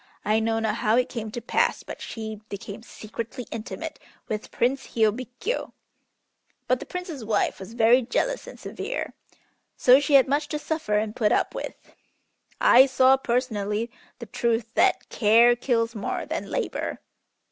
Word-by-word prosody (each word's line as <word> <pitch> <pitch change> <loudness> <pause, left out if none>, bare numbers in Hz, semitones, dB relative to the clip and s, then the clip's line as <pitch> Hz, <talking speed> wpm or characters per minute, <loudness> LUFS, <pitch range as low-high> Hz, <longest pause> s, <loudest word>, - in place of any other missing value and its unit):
I 215 +1 +3
know 225 0 0
not 220 -1 0
how 215 +1 +2
it 250 - +2
came 225 -3 -5
to 235 +3 -6
pass, - - +1
but - - -9
she 220 -2 -6
became 200 +1 -7
secretly 230 +2 -7
intimate 230 - -6 0.3
with 215 -1 -4
Prince 265 +3 -1
Hiôbkiô. 245 - -1 0.9
But 255 - +2
the - - -9
Prince's 355 -8 -6
wife 210 -1 0
was 195 +4 -9
very 240 +2 +5
jealous - - -1
and - - -10
severe, - - -5 0.6
so 255 +2 +7
she 285 0 +2
had 270 -1 +7
much 290 +2 0
to 300 - -3
suffer 310 -8 -1
and 215 0 -2
put 215 -3 +2
up - - +1
with. - - -5 0.8
I 260 +3 +7
saw 260 0 +5
personally 235 -4 -1 0.3
the 235 - -8
truth 230 +1 -1
that - - +2
'care 235 +2 +5
kills 235 -2 0
more 210 -3 -3
than - - -4
labor.'" - - -2
235 Hz, 160 wpm, -25 LUFS, 220-260 Hz, 0.9 s, so